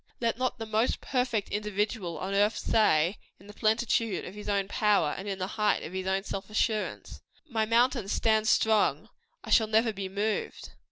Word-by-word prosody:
Let 230 0 -1
not 255 -1 -1
the 225 - -5
most 220 +2 0
perfect 250 -5 -1
individual 210 -4 -2
on 190 +5 -4
earth 205 +2 +2
say, 180 -4 +2 0.2
in 195 - -17
the 205 - -12
plenitude 220 -1 0
of 180 - -8
his 210 0 -7
own 200 -1 0
power, 200 -8 +2
and 195 - -7
in 195 -1 -3
the 185 - -2
height 210 +1 0
of 170 - -7
his 190 0 -4
own 190 0 0 0.3
assurance 215 0 -2 0.3
"My 220 -5 -1
mountain 235 -1 +2
stands 220 +1 +1
strong. 220 -2 +2 0.3
I - - -8
shall 220 - +5
never 220 +1 +2
be 195 -1 -5
moved." 205 +3 -3
210 Hz, 180 wpm, -28 LUFS, 195-225 Hz, 0.3 s, shall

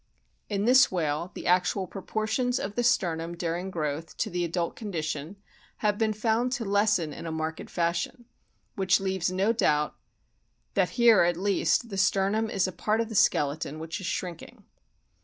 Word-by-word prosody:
In 205 -1 -1
this 255 +1 +6
whale 165 -1 -1
the - - -7
actual 180 +2 +2
proportions 220 +6 -2
of 200 - -4
the 240 - -1
sternum 170 -8 0
during 175 +2 -2
growth 155 -2 -4
to - - -1
the 175 0 -1
adult 170 0 -2
condition 160 -5 -4 0.5
have 210 -1 +2
been 220 -1 +2
found 225 +3 0
to 245 -3 -2
lessen 200 -6 +2
in 170 - -7
a - - -3
marked 160 0 -4
fashion, 170 +7 -2 0.5
which 190 -1 +3
leaves 190 -2 -1
no 195 +5 +2
doubt 150 -10 +1 0.8
that - - +2
here 235 -3 +6
at 175 0 +2
least 205 +4 +1
the 195 -2 -3
sternum 200 +3 +2
is 195 -2 +1
a - - -4
part 215 +4 -1
of 230 -1 -1
the - - -6
skeleton 150 -5 +1
which 165 +5 -5
is 180 - -4
shrinking. 175 0 -5
190 Hz, 170 wpm, -27 LUFS, 170-215 Hz, 0.8 s, this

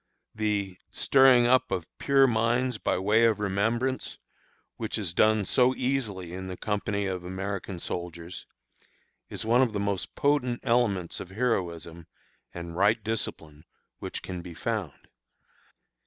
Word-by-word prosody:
The 100 -4 -2
"stirring 130 -3 +5
up 130 +1 +4
of 95 -3 -1
our - - -32
pure 135 -1 +5
minds 120 0 +1
by - - 0
way 105 +5 +3
of 110 -3 +2
remembrance," 115 +6 -1 0.6
which 110 0 -3
is 95 -6 -2
done 110 +2 +3
so 125 +5 +3
easily 105 -10 -2
in 95 +1 -6
the 90 -1 -6
company 100 -1 -2
of 95 -2 -3
American 95 +1 -4
soldiers, 85 0 -6 0.8
is - - -5
one 120 +3 +4
of 120 -4 +2
the 100 - -1
most 100 -2 -2
potent 140 -4 +1
elements 105 -8 +1
of 90 - -7
heroism 85 -7 -2 0.4
and 85 -1 -7
right 100 +4 +3
discipline 80 -9 -3 0.4
which - - -6
can 90 -1 -5
be 85 -1 -10
found. 105 -6 -4
105 Hz, 140 wpm, -27 LUFS, 90-120 Hz, 0.8 s, stirring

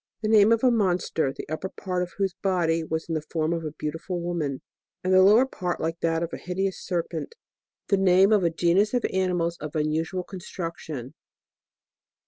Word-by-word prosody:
The - - +1
name 215 0 +6
of 230 +1 +3
a 255 - +5
monster, 180 - +1
the - - -8
upper 155 +5 -4
part 180 -2 -3
of 180 -1 -4
whose 195 -2 0
body 170 -4 +1
was 160 0 -3
in 165 - -3
the 155 - -1
form 160 +1 -1
of 165 -1 -3
a 155 - -3
beautiful 160 +4 -4
woman, 170 -6 -3 0.4
and 185 +1 +1
the 185 - +7
lower 210 +7 +6
part 180 -9 -3
like 165 +1 -2
that 165 0 0
of 170 - -5
a - - -3
hideous 190 0 -3
serpent. 175 - -3 0.5
The 200 - +4
name 190 +1 +5
of 205 -3 +4
a 170 - +3
genus 180 +7 +2
of 245 - +1
animals 175 -3 0
of 150 0 -7
unusual 160 +4 -1
con 190 +1 -9
struction. 160 -8 -6
175 Hz, 195 wpm, -26 LUFS, 165-190 Hz, 0.5 s, the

